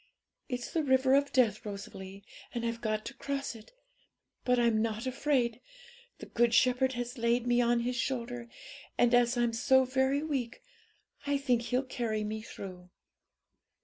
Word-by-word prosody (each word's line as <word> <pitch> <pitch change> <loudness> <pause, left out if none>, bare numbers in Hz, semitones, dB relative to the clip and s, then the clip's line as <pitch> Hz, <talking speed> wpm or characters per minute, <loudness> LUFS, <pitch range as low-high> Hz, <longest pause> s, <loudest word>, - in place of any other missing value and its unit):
It's 245 -2 -4
the 325 - +2
river 260 -2 +3
of 280 +1 +3
death, 230 -6 +2
Rosalie, 200 -1 -8 0.3
and 235 -1 -2
I've 230 0 -3
got 215 -1 -1
to - - -6
cross 275 0 -3
it, 220 -2 -14 0.7
but 250 0 +2
I'm 235 -2 +3
not 225 +1 -2
afraid: 255 -3 0 0.6
the - - -9
Good 235 0 +2
Shepherd 255 +1 +3
has 245 +1 -5
laid 235 +1 +2
me 245 0 +3
on 240 0 +2
His 245 +1 -2
shoulder, 240 -2 -3 0.5
and, 240 0 +4
as 245 0 +4
I'm 240 -1 +1
so 260 +3 +4
very 265 +2 +1
weak, 270 -7 -3 0.6
I 285 0 +2
think 250 -4 +1
He'll 250 +3 0
carry 230 -4 -2
me 215 +1 -4
through.' 185 -4 -9
240 Hz, 160 wpm, -31 LUFS, 230-260 Hz, 0.7 s, and